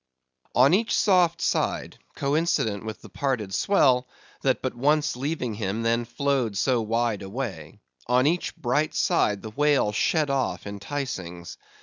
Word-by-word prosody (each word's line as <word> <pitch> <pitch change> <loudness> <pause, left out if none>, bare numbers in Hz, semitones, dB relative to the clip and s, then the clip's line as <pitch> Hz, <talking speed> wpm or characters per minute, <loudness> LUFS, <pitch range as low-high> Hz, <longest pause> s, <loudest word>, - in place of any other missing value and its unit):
On 130 +6 +6
each 220 +4 +2
soft 175 -4 +3
side—coincident 140 - -1
with 110 -1 -7
the 110 - -11
parted 110 -2 -2
swell, 130 - +3 0.3
that 130 -1 +1
but 130 - -1
once 150 +4 +1
leaving 130 -3 -3
him, 105 +1 -3
then 115 +1 +1
flowed 120 -3 -1
so 125 0 +2
wide 115 -1 0
away—on 95 - -3
each 170 +4 0
bright 145 +6 0
side, 105 -2 +1
the 110 - -7
whale 145 -3 +2
shed 150 +7 +1
off 130 -10 -1
enticings. 100 -5 -5
125 Hz, 130 wpm, -25 LUFS, 105-145 Hz, 0.3 s, On